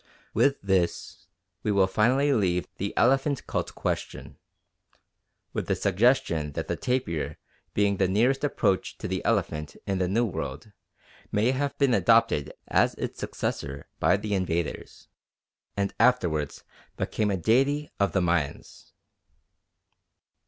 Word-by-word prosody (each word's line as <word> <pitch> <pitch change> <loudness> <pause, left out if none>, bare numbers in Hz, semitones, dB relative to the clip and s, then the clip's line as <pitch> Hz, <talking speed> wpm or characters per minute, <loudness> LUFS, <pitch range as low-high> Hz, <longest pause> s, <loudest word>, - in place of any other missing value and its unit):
With 140 0 +3
this, 95 -3 -1 0.3
we 105 - 0
will 100 -2 +4
finally 125 +9 +2
leave 90 -6 +1
the 100 +1 -2
elephant 135 +3 +2
cult - - -3
question, - - -4 1.1
with - - -3
the - - +1
suggestion 95 - +2
that - - -4
the - - -1
tapir 125 - -2 0.4
being 100 -1 +2
the 95 - +2
nearest 120 +9 +2
approach 100 -9 0
to - - -5
the - - -3
elephant 75 -1 -1
in 95 -1 -1
the 90 - +1
New 115 +6 +2
World, 80 - -5 0.6
may 110 +5 +2
have 140 +1 -2
been 140 -3 +3
adopted 115 -12 +3 0.2
as - - +2
its - - -5
successor 70 0 -4
by - - +4
the 105 -1 -3
invaders 85 -5 -3 0.7
and 100 0 0
afterwards 90 - +2 0.3
became 105 -1 -1
a 95 - 0
deity 135 - +2
of 100 -1 +2
the 95 - +1
Mayans. 85 -5 -2
100 Hz, 130 wpm, -27 LUFS, 90-125 Hz, 1.1 s, will